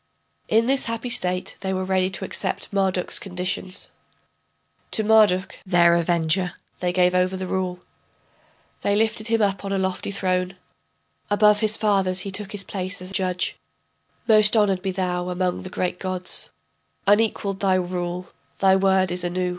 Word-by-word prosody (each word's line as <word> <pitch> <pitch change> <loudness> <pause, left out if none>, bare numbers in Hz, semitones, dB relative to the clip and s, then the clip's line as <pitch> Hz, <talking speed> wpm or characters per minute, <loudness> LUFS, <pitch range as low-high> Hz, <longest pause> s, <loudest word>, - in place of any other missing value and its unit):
[In 225 +1 +3
this 270 +2 +1
happy 230 +1 -3
state 180 -5 0
they 190 -1 -2
were 185 - -2
ready 185 0 +1
to 190 - -3
accept 190 +1 -3
Marduk's 190 -2 0
conditions.] 185 0 -3 1.0
To 220 - 0
Marduk, 210 -4 +3
their 175 -3 +4
avenger, 170 +1 +1 0.3
they 180 -1 0
gave 180 0 +3
over 180 +1 +1
the 185 - -4
rule. 185 -1 -3 1.0
They 200 - +1
lifted 215 0 0
him 225 -1 +2
up 195 -1 0
on 195 - -4
a 195 - 0
lofty 190 0 -2
throne, 185 -1 -1 0.7
Above 210 0 +4
his 215 0 +2
fathers 195 -3 +1
he 195 - -5
took 200 +1 -3
his 205 -2 -4
place 190 0 -3
as 185 +1 -7
judge: 185 -2 0 0.7
Most 215 0 +6
honored 195 -3 +2
be 195 - -2
thou 180 -1 -2
among 180 0 -1
the 185 - -8
great 180 -1 -3
gods, 185 -1 -1 0.6
Unequaled 205 -2 +1
thy 190 -2 +2
rule, 180 0 -3 0.3
thy 190 -1 +4
word 190 -1 +2
is 180 0 +1
Anu. 180 +1 -1
190 Hz, 160 wpm, -23 LUFS, 180-200 Hz, 1.0 s, Most